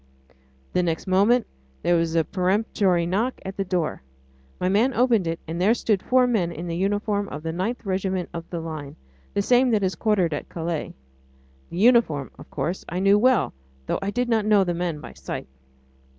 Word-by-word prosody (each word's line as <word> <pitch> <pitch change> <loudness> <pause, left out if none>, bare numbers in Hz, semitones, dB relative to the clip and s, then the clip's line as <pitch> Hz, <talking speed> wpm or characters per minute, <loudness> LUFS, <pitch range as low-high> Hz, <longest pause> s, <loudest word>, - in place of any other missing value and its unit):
The 180 - +3
next 165 -2 -1
moment 205 +6 +3 0.4
there 175 - +3
was 165 -1 0
a 165 - +4
peremptory 185 -1 +1
knock 215 +9 -1
at 190 0 -5
the 195 - -1
door. 180 -4 -2 0.6
My 180 - 0
man 225 +7 +2
opened 230 -7 +3
it, 165 0 -2
and 165 +2 -3
there 215 +5 +4
stood 210 -5 +1
four 255 0 +3
men 210 -9 +1
in 170 +1 -6
the 170 -1 -3
uniform 205 +2 0
of 150 +2 -7
the 165 - -2
9th 195 +9 -3
Regiment 190 -1 -1
of 165 -1 -7
the 170 - -4
Line... 155 -4 -6 0.4
the 200 - +2
same 250 +3 +4
that 215 -4 +2
is 190 0 +1
quartered 185 -2 +1
at 145 - -5
Calais. 165 -2 -4 0.7
The 170 - -7
uniform, 205 - +3
of - - -12
course, 175 +4 -3
I 175 - -3
knew 195 +2 +5
well, 250 -4 +3 0.3
though - - -1
I 195 - -1
did 245 +4 -1
not 225 -2 +2
know 210 -2 +5
the 175 -2 -1
men 170 -3 -2
by - - -9
sight. - - -6
190 Hz, 195 wpm, -24 LUFS, 170-215 Hz, 0.7 s, knew